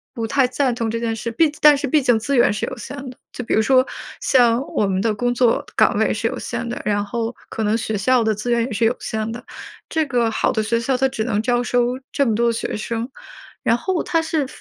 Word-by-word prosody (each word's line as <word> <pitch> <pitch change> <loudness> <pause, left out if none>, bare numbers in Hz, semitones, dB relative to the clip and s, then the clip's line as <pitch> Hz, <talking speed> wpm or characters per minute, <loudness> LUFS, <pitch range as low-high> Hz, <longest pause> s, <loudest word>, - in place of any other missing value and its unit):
不 230 - -2
太 260 +3 +2
赞 255 0 0
同 230 -1 -2
这 230 +1 -2
件 230 -1 -1
事， 230 +1 -4
毕 310 +5 +3
但 295 -1 +7
是 285 - -2
毕 300 +3 +3
竟 245 -3 +3
资 260 +6 -1
源 - - +5
是 210 - -2
有 - - -7
限 280 - -7
的。 250 - -12 0.2
就 250 - -5
比 - - -2
如 220 - +4
说 255 +3 +4 0.4
像 240 -1 +4
我 205 - +1
们 190 0 0
的 220 0 +1
工 245 +3 0
作 245 -2 +2
岗 - - +3
位 - - +2
是 - - -4
有 - - -4
限 235 - -4
的， 235 - -4
然 205 -1 +1
后 230 +3 -3
可 220 - -3
能 215 +2 +2
学 220 -1 -2
校 245 +4 +3
的 220 -1 +2
资 210 +4 -5
源 235 -1 +2
也 260 - -7
是 225 +2 +1
有 235 +2 +2
限 220 0 -3
的， 240 - -8 0.5
这 320 -1 +1
个 240 -4 +1
好 - - +1
的 220 - 0
学 230 +2 0
校 255 +3 0
它 265 +1 +2
只 220 -3 -3
能 210 -4 0
招 240 +1 +1
收 245 +1 0
这 280 - +2
么 225 - +1
多 235 +2 +2
的 235 - +2
学 225 - -3
生。 230 +2 -3 0.5
然 230 - +2
后 365 +6 -1
它 330 -1 +1
是 320 -3 -1
235 Hz, 285 characters per minute, -21 LUFS, 220-255 Hz, 0.5 s, 但